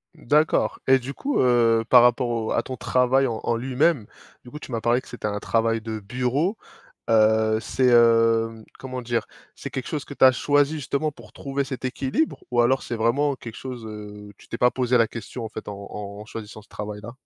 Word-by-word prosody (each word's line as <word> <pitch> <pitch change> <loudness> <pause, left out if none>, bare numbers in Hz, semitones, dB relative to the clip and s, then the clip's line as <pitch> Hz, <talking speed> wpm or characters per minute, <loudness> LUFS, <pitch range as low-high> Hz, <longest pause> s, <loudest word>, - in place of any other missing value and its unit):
D'accord 155 0 +1
et 135 0 +6
du 130 +2 -6
coup, 285 +1 -2
heu, 115 -2 +3
par 125 -1 +8
rapport 120 0 +3
au 115 -2 -2
à 115 - +1
ton 130 - -6
travail 130 +2 +2
en 115 -2 -4
en 115 - 0
lui-même, 130 0 +1 0.4
du 125 - -12
coup 150 - -9
tu 130 - -10
m'as 115 -1 -2
parlé 120 +2 +2
que - - -19
c'était 120 -3 -5
un 105 0 -3
travail 115 0 0
de 110 -1 -5
bureau. 125 - -1 0.5
Heu, 110 0 +4
c'est 130 +1 +1
heu, 115 -1 +5
mmh, 110 -1 -13 0.2
comment 130 -1 -6
dire? 120 0 -1 0.3
C'est - - -7
quelque 130 - -5
chose 150 -3 -4
que 145 - -9
tu - - +5
as 130 - +8
choisi 145 +3 +2
justement 150 +2 -2
pour 115 -6 -16
trouver 140 0 -3
cet 130 -1 -6
équilibre 135 - -2
ou 120 - +1
alors 130 +3 +2
c'est 120 - -4
vraiment 135 +6 +1
quelque 115 -3 -10
chose, 125 -4 -7
heu, 105 -1 -9
tu - - -18
t'es 115 - -5
pas 125 0 +4
posé 125 -1 +1
la 115 -1 +3
question 115 +1 -7
en - - -6
fait 110 - -9
en 100 - -5 0.2
en 100 0 -7
en - - -10
choisissant 110 0 -9
ce - - -26
travail 105 0 -6
là? 115 - -7
120 Hz, 225 wpm, -24 LUFS, 110-130 Hz, 0.5 s, par